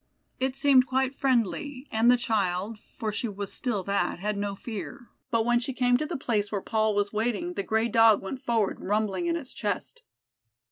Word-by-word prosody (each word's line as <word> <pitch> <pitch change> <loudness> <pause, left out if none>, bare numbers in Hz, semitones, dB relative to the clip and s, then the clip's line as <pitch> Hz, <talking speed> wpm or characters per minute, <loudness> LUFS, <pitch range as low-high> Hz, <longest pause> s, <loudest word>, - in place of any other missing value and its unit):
It 260 0 -1
seemed 270 -2 +5
quite 265 +1 +1
friendly, 260 - 0
and 225 +2 +3
the 250 - +6
child 210 -2 -1 0.2
(for 220 -3 -2
she 210 +3 -2
was 200 -2 -5
still 220 -7 -2
that) 200 +2 0
had 210 +3 -2
no 200 0 -2
fear, 235 +4 -7 0.2
but 230 -3 +1
when 240 0 +3
she 255 +2 -3
came 245 -1 +3
to 305 - -3
the - - -3
place 210 -6 -1
where 205 - -1
Paul 215 +1 0
was 205 0 0
waiting, 240 +11 -1
the - - -2
gray 220 +3 +1
Dog 225 -2 +5
went 255 +7 -6
forward 225 -4 0
rumbling 215 - -1
in 335 - +1
its 285 -6 -5
chest. 175 - -3
225 Hz, 195 wpm, -27 LUFS, 205-255 Hz, 0.2 s, the